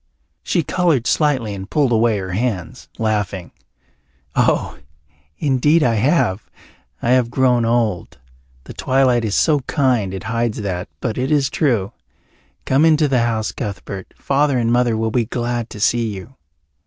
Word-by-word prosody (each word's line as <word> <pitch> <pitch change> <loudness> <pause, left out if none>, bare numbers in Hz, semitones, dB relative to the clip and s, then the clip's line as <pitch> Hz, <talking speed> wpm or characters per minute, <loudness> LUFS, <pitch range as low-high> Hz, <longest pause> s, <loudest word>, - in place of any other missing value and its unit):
She 170 - 0
coloured 160 -6 +1
slightly 130 -6 +1
and 95 0 -7
pulled 145 -5 +1
away 115 -1 +2
her 95 -1 -5
hands, 110 +2 -3
laughing. 105 -5 -2 0.8
"Oh, - - +1 0.6
indeed 150 +3 +2
I 120 - +2
have. 110 - +1 0.5
I 120 - +2
have 125 -2 +3
grown 125 -2 +2
old. 115 -6 -1 0.5
The - - -10
twilight 130 -2 +2
is 105 -3 -1
so 150 -2 +3
kind 125 -7 0
it 95 -1 -6
hides 115 -1 -2
that, 90 -3 -4
but 115 0 -2
it 130 +2 -1
is 145 -3 +2
true. 125 - 0 0.7
Come 135 +3 +3
into 155 -2 +4
the 135 -3 +2
house, 110 -2 -1
Cuthbert. 100 -4 -6
Father 140 -1 +1
and 115 -1 +1
Mother 120 -2 +2
will 110 0 -1
be 120 0 +1
glad 120 0 -3
to 105 - -9
see 115 +2 +2
you." 105 +5 -8
120 Hz, 155 wpm, -19 LUFS, 110-135 Hz, 0.8 s, into